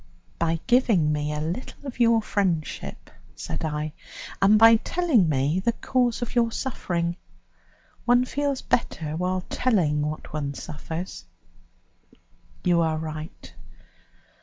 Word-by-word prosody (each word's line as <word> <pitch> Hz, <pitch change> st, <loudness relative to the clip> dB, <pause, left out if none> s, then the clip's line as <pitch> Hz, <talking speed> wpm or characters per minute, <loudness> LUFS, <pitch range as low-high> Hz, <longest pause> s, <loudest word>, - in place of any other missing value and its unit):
"By 165 Hz, 0 st, +1 dB
giving 230 Hz, -11 st, +3 dB
me 150 Hz, 0 st, -1 dB
a 150 Hz, -, -2 dB
little 170 Hz, -, -5 dB
of 260 Hz, -3 st, -7 dB
your 230 Hz, -2 st, +4 dB
friendship," 180 Hz, -8 st, -2 dB, 0.2 s
said -, -, -5 dB
I, 150 Hz, -1 st, -2 dB, 0.5 s
"and 200 Hz, +2 st, +6 dB
by 225 Hz, +1 st, +8 dB
telling 260 Hz, -, +2 dB
me 145 Hz, +4 st, +1 dB
the 235 Hz, +5 st, +1 dB
cause 245 Hz, -1 st, 0 dB
of 240 Hz, -, -6 dB
your 235 Hz, -2 st, +2 dB
suffering. 175 Hz, -10 st, -2 dB, 0.9 s
One 245 Hz, +1 st, +4 dB
feels 280 Hz, 0 st, -2 dB
better 155 Hz, -9 st, -1 dB
while 180 Hz, +2 st, -1 dB
telling 175 Hz, -12 st, +1 dB
what 150 Hz, 0 st, -4 dB
one 140 Hz, -2 st, -3 dB
suffers." 160 Hz, -, -6 dB, 1.4 s
"You 175 Hz, -2 st, +3 dB
are 160 Hz, -1 st, +1 dB
right. 155 Hz, 0 st, -7 dB
180 Hz, 125 wpm, -25 LUFS, 155-235 Hz, 1.4 s, by